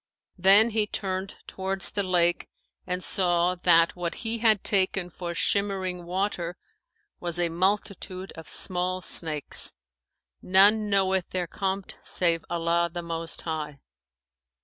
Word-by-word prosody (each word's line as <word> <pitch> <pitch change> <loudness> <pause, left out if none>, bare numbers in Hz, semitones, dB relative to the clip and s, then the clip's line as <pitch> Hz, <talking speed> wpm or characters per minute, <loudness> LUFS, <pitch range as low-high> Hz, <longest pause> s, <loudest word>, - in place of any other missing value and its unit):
Then 200 +5 +6
he 215 -1 +1
turned 190 -1 -3
towards 190 0 +1
the 205 - -1
lake 175 -2 +1 0.4
and 180 0 -3
saw 175 -1 +2
that 170 -2 +3
what 175 -1 -3
he 225 +1 -1
had 220 -3 +3
taken 190 -2 +1
for 170 0 -6
shimmering 190 -2 -1
water 180 -1 -2 0.6
was 175 0 0
a 175 -1 +1
multitude 190 +1 -2
of 160 -1 -11
small 185 0 0
snakes, 155 -4 -1 0.7
none 205 +3 +4
knoweth 190 -2 +1
their 180 -1 -2
compt 195 +2 -4
save 170 -2 0
Allah 170 0 0
the 175 0 -5
Most 165 0 -3
High. 150 -3 -4
185 Hz, 125 wpm, -26 LUFS, 170-195 Hz, 0.7 s, Then